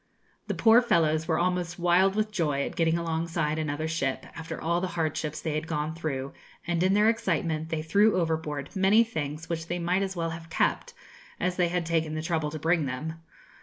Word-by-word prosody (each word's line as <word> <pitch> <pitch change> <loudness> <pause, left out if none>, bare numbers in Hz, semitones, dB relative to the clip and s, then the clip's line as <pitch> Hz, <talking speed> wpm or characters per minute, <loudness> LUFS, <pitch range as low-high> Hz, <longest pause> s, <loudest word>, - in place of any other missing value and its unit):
The - - -2
poor 230 +2 +6
fellows 160 -8 +2
were 160 - +1
almost 175 -1 -1
wild 180 +2 +3
with 215 0 0
joy 150 -8 0
at - - -5
getting 165 0 +2
alongside 165 -2 -1
another 155 0 -2
ship, 140 -5 -2
after 160 0 -6
all 170 +2 0
the 185 - -1
hardships 155 -1 -1
they 155 - -3
had 155 +1 -2
gone 155 -1 -2
through, 140 -5 -4 0.3
and 175 -1 0
in 190 +2 +3
their 210 +1 +4
excitement 165 -8 0
they 160 -1 -2
threw 200 +4 +3
overboard 160 -3 -2
many 195 +4 +5
things 155 -7 -5
which 165 -1 -3
they 175 - -2
might 175 +2 +1
as 195 -1 -2
well 165 -1 -2
have 165 0 -8
kept, - - 0 0.4
as 180 0 0
they 180 -1 +2
had 175 0 -1
taken 160 -2 0
the 155 - -3
trouble 160 -3 -1
to 155 - -5
bring 160 -1 +1
them. 160 +6 -5
165 Hz, 205 wpm, -27 LUFS, 155-180 Hz, 0.4 s, poor